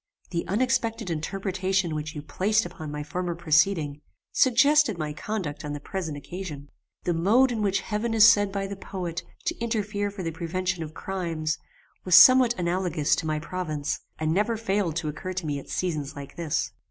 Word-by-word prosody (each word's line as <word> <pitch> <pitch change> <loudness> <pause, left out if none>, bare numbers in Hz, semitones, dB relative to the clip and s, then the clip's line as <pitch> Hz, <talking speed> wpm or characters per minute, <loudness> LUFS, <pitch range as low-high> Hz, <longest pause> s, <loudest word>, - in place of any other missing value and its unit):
The 170 -2 -2
unexpected 230 -2 0
interpretation 190 +2 -1
which 155 +1 -4
you 145 - -6
placed 210 +7 +1
upon 165 -3 -7
my 150 0 -4
former 175 +3 -3
proceeding, 160 -2 +2 0.3
suggested 280 - +4
my 155 -2 -3
conduct 170 -3 -4
on 150 -1 -4
the 145 - -4
present 160 -1 -4
occasion. 150 -3 -7 0.3
The 175 - +1
mode 220 +10 +4
in 225 -3 -2
which 195 -2 +1
heaven 225 +3 -2
is 220 0 +9
said 205 -3 +5
by 195 0 -2
the 200 +1 -5
poet, 180 -3 -5 0.2
to - - -1
interfere 210 -3 -1
for 200 -2 -7
the 165 - -2
prevention 180 +2 -2
of 155 0 -6
crimes, 165 -5 -2 0.2
[] - - -36
was 180 -2 +4
somewhat 255 -2 +8
analogous 175 -3 +1
to 160 - -3
my 155 0 0
province, 155 -3 -3 0.2
and 155 0 0
never 210 +5 +1
failed 200 -6 0
to 165 -2 -2
occur 150 +5 -4
to 180 -2 -4
me 145 -2 -2
at - - -13
seasons 155 -5 -2
like 140 -1 -9
this. 165 -3 -1
180 Hz, 185 wpm, -26 LUFS, 155-205 Hz, 0.3 s, is